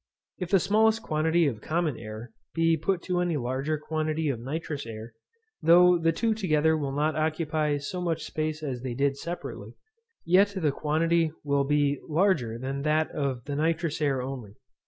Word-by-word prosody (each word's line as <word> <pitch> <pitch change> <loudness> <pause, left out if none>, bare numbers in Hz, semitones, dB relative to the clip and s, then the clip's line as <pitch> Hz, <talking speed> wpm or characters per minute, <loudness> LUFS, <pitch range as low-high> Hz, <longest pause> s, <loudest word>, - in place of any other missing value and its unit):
If 180 -2 -4
the 195 - +5
smallest 220 +4 +3
quantity 160 +2 +2
of 115 -7 -2
common 160 -1 -1
air 110 +1 -8 0.2
be 165 0 +3
put 170 +3 -1
to 180 -1 -1
any 175 -3 0
larger 135 +4 -1
quantity 155 0 -2
of 125 -5 -2
nitrous 145 +1 -4
air, 110 0 -8 0.5
though 175 +2 +6
the 165 0 +3
two 225 +7 0
together 160 -6 +2
will 145 -3 -2
not 150 +3 0
occupy 155 -1 0
so 180 +6 -5
much 165 -3 -1
space 155 0 -3
as 130 -5 -3
they 125 -2 -4
did 140 +1 +1
separately, 135 -8 -7 0.5
yet 195 +4 +4
the 155 -6 +1
quantity 160 +3 +1
will 140 -1 +1
still - - -8
be 145 -1 +1
larger 155 - +1
than 135 +3 -4
that 155 +2 +1
of 135 -4 -2
the 145 - -3
nitrous 160 +1 0
air 135 -4 +1
only. 125 -6 -7
155 Hz, 175 wpm, -27 LUFS, 140-165 Hz, 0.5 s, though